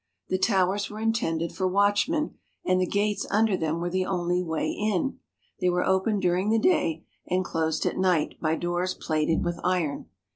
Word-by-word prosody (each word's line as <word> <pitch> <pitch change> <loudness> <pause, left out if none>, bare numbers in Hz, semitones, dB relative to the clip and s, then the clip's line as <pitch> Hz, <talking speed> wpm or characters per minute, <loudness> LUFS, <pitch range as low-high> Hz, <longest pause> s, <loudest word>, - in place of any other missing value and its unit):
The 185 - 0
towers 195 0 +2
were 210 - -8
intended 195 -8 0
for 190 -2 -1
watchmen, 205 - +2 0.3
and 185 0 +2
the 185 - +1
gates 205 +1 0
under 215 -1 +3
them 160 -1 -1
were 175 +1 -2
the 185 0 0
only 180 -1 0
way 160 -3 -1
in. 210 +4 -1 0.4
They 180 -2 +2
were 180 0 +1
open 190 +3 +2
during 185 +2 +1
the 225 - +3
day 215 - +1 0.2
and 185 0 0
closed 160 -2 -1
at - - -1
night 180 -5 +1
by 160 0 +1
doors 175 +2 -1
plated 155 0 0
with 175 0 -2
iron. 175 -6 -1
185 Hz, 180 wpm, -26 LUFS, 170-205 Hz, 0.4 s, under